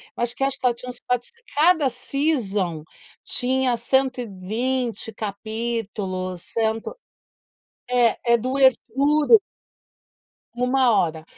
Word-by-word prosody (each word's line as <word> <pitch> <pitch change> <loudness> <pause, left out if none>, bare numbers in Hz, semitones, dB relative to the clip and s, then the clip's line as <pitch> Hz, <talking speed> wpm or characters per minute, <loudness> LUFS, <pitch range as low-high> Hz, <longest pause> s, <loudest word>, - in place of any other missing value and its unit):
eu 240 - -2
acho 240 - 0
que 270 - -2
acho 275 0 0
que - - -5
ela 245 - +4
tinha 250 +1 -9
uns 245 - -8
quatrocen 250 - -3
cada 310 -2 +4
season 235 - -1 0.4
tinha 255 0 +1
120 240 -1 -1
capítulos, 205 -4 -4
cento 225 - -2 0.9
é, 245 -2 +3 0.2
é - - +7
doer 260 +3 +4 0.2
puro 300 - +4 1.1
1 250 +1 +2
hora. 160 -4 0
245 Hz, 110 wpm, -23 LUFS, 220-265 Hz, 1.1 s, é